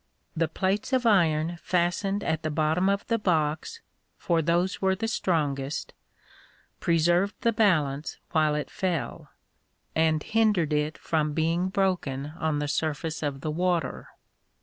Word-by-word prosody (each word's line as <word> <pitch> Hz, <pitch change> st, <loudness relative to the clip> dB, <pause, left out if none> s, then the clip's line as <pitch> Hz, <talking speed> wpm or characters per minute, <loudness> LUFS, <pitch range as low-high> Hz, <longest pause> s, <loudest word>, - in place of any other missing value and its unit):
The 165 Hz, 0 st, +1 dB
plates 195 Hz, -, -1 dB
of 255 Hz, -1 st, +2 dB
iron 170 Hz, -5 st, +3 dB
fastened 185 Hz, +3 st, 0 dB
at 160 Hz, -1 st, -1 dB
the 155 Hz, -, -2 dB
bottom 160 Hz, +5 st, +1 dB
of 200 Hz, 0 st, 0 dB
the 230 Hz, -1 st, 0 dB
box 170 Hz, -, 0 dB, 0.4 s
(for 170 Hz, -2 st, +1 dB
those 175 Hz, +4 st, 0 dB
were 190 Hz, 0 st, +2 dB
the 225 Hz, +4 st, -2 dB
strongest) 150 Hz, -, -1 dB, 0.9 s
preserved 175 Hz, +4 st, +2 dB
the 230 Hz, -, +2 dB
balance 155 Hz, -10 st, +1 dB
while 155 Hz, -2 st, +2 dB
it 150 Hz, -, -3 dB
fell, 180 Hz, -5 st, -3 dB, 0.6 s
and 160 Hz, -1 st, +2 dB
hindered 210 Hz, -9 st, +2 dB
it 150 Hz, +1 st, 0 dB
from 155 Hz, -2 st, -1 dB
being 165 Hz, +4 st, +1 dB
broken 170 Hz, -8 st, -1 dB
on 160 Hz, -3 st, 0 dB
the 145 Hz, 0 st, -1 dB
surface 155 Hz, +2 st, -2 dB
of 140 Hz, -3 st, -3 dB
the 155 Hz, -, -2 dB
water. 170 Hz, -3 st, -1 dB
165 Hz, 140 wpm, -27 LUFS, 155-190 Hz, 0.9 s, iron